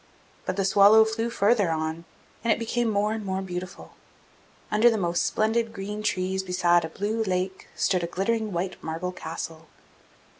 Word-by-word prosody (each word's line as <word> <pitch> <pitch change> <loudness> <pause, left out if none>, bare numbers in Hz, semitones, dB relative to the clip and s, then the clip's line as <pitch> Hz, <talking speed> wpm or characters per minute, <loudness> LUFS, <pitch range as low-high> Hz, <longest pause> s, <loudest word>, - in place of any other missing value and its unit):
But 185 - -1
the 195 -1 0
swallow 205 +3 +7
flew 220 +1 -2
on - - -1
farther, 210 -3 +2
and 160 +1 -2 0.4
it 225 - +3
became 235 +1 -1
more 210 0 +1
and 220 -1 -4
more 190 -1 -2
beautiful. 180 -1 -7 0.8
Under 215 +3 +5
the 225 - 0
most 175 -3 0
splendid 225 +1 0
green 210 +1 -5
trees 190 -2 -1
besides 180 -2 +2
a - - -6
blue 210 +6 -2
lake 185 -1 -2
stood 180 -2 +1
a - - -1
glittering 215 +5 -1
white 185 +1 -3
marble 165 +3 -3
castle. 160 -2 -7
195 Hz, 165 wpm, -26 LUFS, 180-220 Hz, 0.8 s, swallow